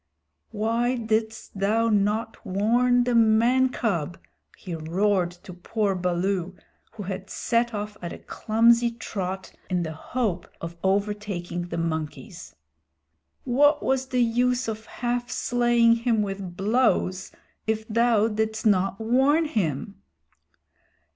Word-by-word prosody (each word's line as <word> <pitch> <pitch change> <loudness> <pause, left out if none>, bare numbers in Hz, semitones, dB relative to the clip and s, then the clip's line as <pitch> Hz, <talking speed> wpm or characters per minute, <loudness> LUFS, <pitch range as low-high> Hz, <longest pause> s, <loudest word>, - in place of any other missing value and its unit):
"Why 230 +3 0
didst 220 -3 -2
thou 220 +4 +2
not 210 +2 0
warn 240 +6 +2
the 245 0 0
man 235 +3 +4
cub?" 175 -10 -2 0.4
he 180 - -7
roared 175 +3 +1
to 185 - -9
poor 200 +3 -1
Baloo, 180 0 -1 0.4
who 220 -3 -7
had 190 0 -6
set 235 0 0
off 210 0 -5
at 170 -1 -5
a - - -7
clumsy 230 +2 +2
trot 195 -5 -5 0.2
in 180 -1 0
the 160 - -4
hope 200 +2 -3
of 170 0 -6
overtaking 195 -3 -1
the - - -5
monkeys. 165 +3 -5 0.9
"What 290 +4 +3
was 265 0 0
the 250 -2 +2
use 245 +2 +1
of 220 0 -5
half 245 0 -3
slaying 240 -1 +3
him 230 -2 +1
with 195 -3 -6
blows 200 -3 +1 0.4
if 220 0 -1
thou 230 -1 +3
didst 220 0 -2
not 195 -2 +2
warn 265 +8 +3
him?" 200 - -2
220 Hz, 125 wpm, -25 LUFS, 190-235 Hz, 0.9 s, man